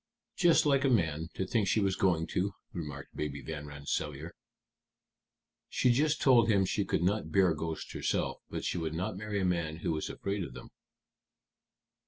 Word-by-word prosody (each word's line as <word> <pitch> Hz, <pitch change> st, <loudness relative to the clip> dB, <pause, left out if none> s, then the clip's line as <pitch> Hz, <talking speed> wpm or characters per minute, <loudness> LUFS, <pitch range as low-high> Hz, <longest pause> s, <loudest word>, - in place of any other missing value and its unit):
"Just 175 Hz, -4 st, +4 dB
like 140 Hz, -2 st, +3 dB
a 135 Hz, -, +3 dB
man 80 Hz, -, +1 dB
to 95 Hz, -, -1 dB
think 110 Hz, -2 st, +1 dB
she 110 Hz, -, +3 dB
was 95 Hz, -2 st, +1 dB
going 85 Hz, -4 st, +2 dB
to," 95 Hz, +2 st, 0 dB, 0.2 s
remarked 75 Hz, -5 st, -7 dB
Baby 70 Hz, -2 st, -4 dB
Van 75 Hz, +2 st, -6 dB
Rensselaer. 75 Hz, +2 st, -4 dB, 1.4 s
"She 125 Hz, -, +3 dB
just 150 Hz, +5 st, +2 dB
told 120 Hz, -4 st, +5 dB
him 100 Hz, -3 st, +4 dB
she 100 Hz, +2 st, 0 dB
could 85 Hz, -, 0 dB
not 95 Hz, -3 st, 0 dB
bear 95 Hz, -3 st, +4 dB
ghosts 80 Hz, +1 st, -5 dB
herself, -, -, -1 dB
but -, -, -4 dB
she 90 Hz, -, -1 dB
would 80 Hz, -1 st, -3 dB
not 90 Hz, +2 st, -2 dB
marry 105 Hz, +1 st, -3 dB
a 95 Hz, -, +1 dB
man 85 Hz, -3 st, 0 dB
who -, -, +2 dB
was 75 Hz, -1 st, -2 dB
afraid 100 Hz, 0 st, -3 dB
of 65 Hz, -6 st, -8 dB
them." -, -, -10 dB
90 Hz, 180 wpm, -31 LUFS, 80-105 Hz, 1.4 s, told